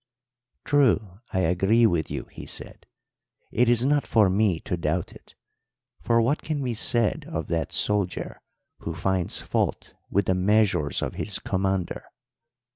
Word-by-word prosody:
"'True, 110 Hz, -10 st, +2 dB
I 95 Hz, -, 0 dB
agree 95 Hz, +7 st, +3 dB
with 85 Hz, -7 st, +1 dB
you,' -, -, -4 dB
he -, -, -10 dB
said. -, -, -9 dB, 0.6 s
'It 120 Hz, +1 st, +3 dB
is 120 Hz, +1 st, +3 dB
not 145 Hz, +1 st, +2 dB
for 105 Hz, -5 st, +4 dB
me 95 Hz, -3 st, +2 dB
to -, -, -2 dB
doubt 85 Hz, +1 st, -2 dB
it, -, -, -17 dB, 0.7 s
for 115 Hz, -1 st, +2 dB
what 140 Hz, +6 st, +1 dB
can 150 Hz, -3 st, -3 dB
be 125 Hz, -2 st, -1 dB
said 115 Hz, 0 st, +1 dB
of 80 Hz, -1 st, -3 dB
that 85 Hz, -1 st, -1 dB
soldier 100 Hz, -4 st, -1 dB, 0.4 s
who 85 Hz, -, -5 dB
finds 95 Hz, -1 st, -1 dB
fault -, -, -2 dB, 0.2 s
with 100 Hz, 0 st, +1 dB
the 95 Hz, -, +2 dB
measures 95 Hz, -5 st, +2 dB
of -, -, -3 dB
his 105 Hz, -, -2 dB
commander? 95 Hz, -2 st, -2 dB
100 Hz, 150 wpm, -25 LUFS, 90-115 Hz, 0.7 s, for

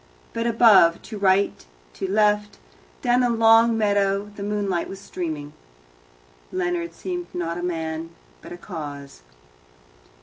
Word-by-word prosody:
But 230 Hz, +1 st, -1 dB
above, 215 Hz, -8 st, +5 dB
to 215 Hz, -2 st, -8 dB
right, 195 Hz, 0 st, +2 dB, 0.3 s
to 190 Hz, -, -4 dB
left, 210 Hz, 0 st, +1 dB, 0.5 s
down 245 Hz, -1 st, +3 dB
the 245 Hz, -1 st, +2 dB
long 225 Hz, 0 st, +5 dB
meadow 200 Hz, -1 st, +1 dB
the 200 Hz, -, -9 dB
moonlight 200 Hz, -3 st, -2 dB
was 195 Hz, -, -8 dB
streaming. 155 Hz, -6 st, -5 dB, 1.0 s
Leonard 175 Hz, -2 st, -2 dB
seemed 355 Hz, -, -5 dB
not 170 Hz, -1 st, -3 dB
a -, -, -4 dB
man, 165 Hz, -2 st, -3 dB, 0.3 s
but -, -, -12 dB
a 175 Hz, -, -7 dB
cause. 145 Hz, -, -8 dB
195 Hz, 130 wpm, -23 LUFS, 170-215 Hz, 1.0 s, above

